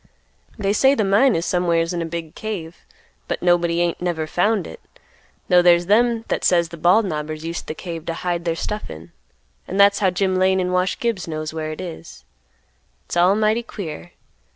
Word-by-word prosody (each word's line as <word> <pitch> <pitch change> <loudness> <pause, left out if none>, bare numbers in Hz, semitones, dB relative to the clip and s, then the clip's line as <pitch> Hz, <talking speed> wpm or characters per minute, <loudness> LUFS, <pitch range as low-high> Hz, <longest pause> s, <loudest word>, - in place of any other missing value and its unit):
They 200 -2 0
say 270 +6 +4
the 220 - +1
mine 205 +6 +4
is 165 +1 -1
somewhere's 170 -1 +1
in 175 - -2
a 165 - -3
big 165 -1 -6
cave, 185 -7 -6 0.5
but - - -3
nobody 175 -1 +2
ain't 175 0 -1
never 170 -3 -1
found 200 +5 0
it, 80 - -10 0.7
'though 180 -1 +5
there's 175 0 +4
them 230 +3 +2
that - - -2
says 170 -2 +3
the 170 - -9
Bald 180 +7 +4
Knobbers 155 -2 -4
used 165 +1 -5
the 155 - -5
cave 165 -2 -7
to 165 - -2
hide 175 -1 -2
their 165 -1 -1
stuff 210 +5 -4
in, 80 +2 -10 0.6
and 190 - -3
that's 200 0 +5
how 195 -2 +3
Jim 185 +1 0
Lane 190 0 +3
and 180 0 -1
Wash 180 +1 +1
Gibbs 230 -7 -2
knows 155 -1 -4
where 155 -1 -4
it 155 - -8
is; 170 -2 -9 0.8
it's - - -6
all 180 +3 +4
mighty 215 +2 +2
queer. 175 -7 -8
175 Hz, 200 wpm, -21 LUFS, 165-200 Hz, 0.8 s, though